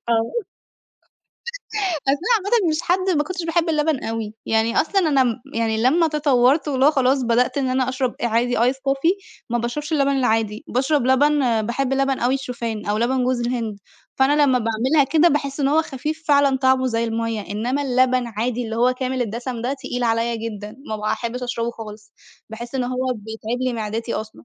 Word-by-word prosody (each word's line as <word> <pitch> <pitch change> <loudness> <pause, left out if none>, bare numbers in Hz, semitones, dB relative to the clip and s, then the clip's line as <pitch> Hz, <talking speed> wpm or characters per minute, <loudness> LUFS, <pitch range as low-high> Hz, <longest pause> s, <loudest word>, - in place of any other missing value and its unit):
آه، 235 - +3 2.0
أصل 280 +1 +2
أنا 460 +8 -1
عامةً 410 -1 +1
مش 310 +1 0
حد 370 +2 +1
ما 295 - +2
كنتش 360 +1 -5
باحب 335 0 +1
اللبن 305 -3 0
أوي، 225 -1 -4
يعني 225 +1 +2
أصلًا 390 +5 0
أنا 270 -2 +4
م 235 -2 0 0.2
يعني 225 -1 0
لمّا 320 +6 +4
تطورت 290 -1 +2
واللي 270 -1 +2
هو 300 - +6
خلاص 265 -2 +2
بدأت 240 +3 +1
إن 265 -2 0
أنا 255 0 +1
أشرب 260 -1 -2
آآ 240 - +1
عادي 240 +2 +1
ice 245 +3 +3
coffee 275 +9 -2
ما 240 - 0
باشربش 265 +6 -4
اللبن 280 -2 +2
العادي، 225 -5 0
باشرب 265 +1 +1
لبن 260 -3 +3
باحب 250 +4 -1
لبن 270 0 +1
أوي 245 +2 +1
الشوفان 235 -5 -4
أو 205 +1 0
لبن 250 +3 +1
جوز 255 -1 0
الهند، 235 -4 -3 0.4
فأنا 265 +2 +3
لمّا 260 -3 +3
باعملها 240 +7 +2
كده 320 +2 +5
باحس 280 -2 -1
إن 275 - +2
هو 310 +3 +3
خفيف 310 +3 -5
فعلًا 280 -2 +4
طعمه 260 0 +2
زي 230 -1 0
المَيّة، 230 -1 -2
إنّما 245 +7 -1
اللبن 255 -2 +2
عادي 235 +2 -2
اللي 225 - -4
هو 245 +2 +3
كامل 255 0 -2
الدسم 235 +2 -4
ده 255 +4 -1
تقيل 250 -2 -4
عليَّ 230 0 +1
جدًا، 215 -1 -6
ما 215 - -2
باحبش 235 +3 -3
أشربه 235 -1 -2
خالص، 210 -2 -11 0.4
باحس 235 +3 -7
إن 260 - 0
هو 255 +1 -1
بيتعب 220 +3 -5
لي 255 -1 0
معدتي 225 +1 -3
أصلًا. 220 0 -4
255 Hz, 190 wpm, -21 LUFS, 230-275 Hz, 2.0 s, هو